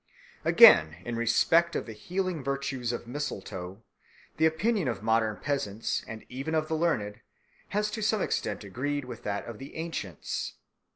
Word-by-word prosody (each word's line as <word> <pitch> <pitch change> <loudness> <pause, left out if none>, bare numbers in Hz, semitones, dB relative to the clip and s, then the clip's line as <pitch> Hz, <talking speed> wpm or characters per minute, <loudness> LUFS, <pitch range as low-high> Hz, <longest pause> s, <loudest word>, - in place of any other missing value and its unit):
Again, 80 0 +8
in 120 - -3
respect 165 +9 +3
of - - -1
the 115 - -7
healing 180 - -3
virtues 135 -3 -2
of 120 - -5
mistletoe 100 -7 -5 0.5
the 160 +1 +5
opinion 185 - +1
of 110 -5 -3
modern 110 -1 +2
peasants, 115 -7 -2
and 110 -1 -8
even 135 +6 -3
of 155 0 +1
the 160 - -1
learned, 105 -11 0 0.5
has 210 +1 -1
to 220 - -4
some 215 0 +2
extent - - -2
agreed 135 +8 -3
with 120 -2 -8
that 100 -1 -3
of 115 -2 -8
the 135 - -10
ancients. 160 - -4
130 Hz, 160 wpm, -29 LUFS, 110-160 Hz, 0.5 s, Again